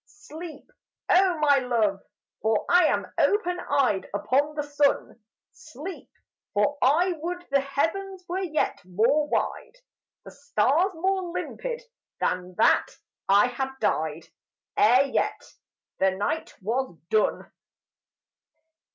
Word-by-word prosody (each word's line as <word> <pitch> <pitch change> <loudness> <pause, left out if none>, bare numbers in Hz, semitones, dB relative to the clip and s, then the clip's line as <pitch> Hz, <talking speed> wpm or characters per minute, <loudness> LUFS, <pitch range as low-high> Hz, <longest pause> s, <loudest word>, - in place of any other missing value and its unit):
Sleep! 305 +2 -10 0.4
Oh, 365 -1 +4
my 290 -2 +4
Love, 225 -6 0 0.4
for 220 -1 +1
I 355 -1 +5
am - - +1
open 360 -4 +2
eyed 265 - 0
Upon 280 +8 +1
the 295 - -1
sun; 290 -4 0 0.3
Sleep! 330 +8 -9 0.5
for 210 +8 +1
I 325 +8 +4
would 350 +3 -5
the 280 - +4
heavens 360 +7 -2
were 360 +2 -2
yet 320 -5 -1
more 230 +12 +2
wide, - - -2 0.5
The - - -10
stars 285 - +1
more 375 +1 -1
limpid, - - -5 0.4
and 180 0 -2
that - - +4 0.4
I 200 +3 +6
had 250 +2 -2
died 160 +1 -1 0.5
Ere 250 +6 +5
yet 275 - -1 0.6
the 190 - +4
night 205 +12 -3
was 235 -3 -2
done. 215 -1 +1
285 Hz, 115 wpm, -26 LUFS, 225-350 Hz, 0.6 s, I